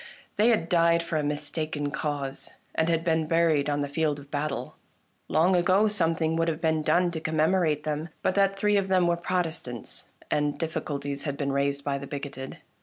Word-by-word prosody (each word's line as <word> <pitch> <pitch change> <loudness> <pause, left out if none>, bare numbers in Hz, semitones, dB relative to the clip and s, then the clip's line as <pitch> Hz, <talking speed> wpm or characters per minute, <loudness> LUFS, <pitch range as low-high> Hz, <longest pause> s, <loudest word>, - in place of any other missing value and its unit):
They 215 - +4
had 220 -8 +3
died 170 -1 +3
for 165 -1 -2
a 150 - 0
mistaken 150 0 -2
cause, 145 -3 -4 0.2
and 160 +1 +1
had 165 -1 +1
been 160 -2 +1
buried 160 -3 +2
on 145 0 0
the 145 - -1
field 150 0 0
of 145 0 -13
battle. 145 -1 -3 0.5
Long 175 +4 +3
ago 185 +4 +4
something 165 -5 +1
would 165 0 +1
have 160 -1 -1
been 160 -2 +1
done 175 +3 +2
to 165 - -4
commemorate 160 -1 +1
them 155 +2 -3
but - - +2
that 195 0 +2
three 210 +1 +3
of 195 -1 +1
them 185 -2 +3
were 170 0 +3
Protestants, 170 - -4 0.2
and 150 -1 +1
dif 165 -1 -3
ficulties 145 -2 -3
had 140 -2 -2
been 140 -1 -1
raised 140 0 0
by 140 -1 -1
the 140 - -7
bigoted. 140 -2 -6
160 Hz, 195 wpm, -27 LUFS, 145-170 Hz, 0.5 s, They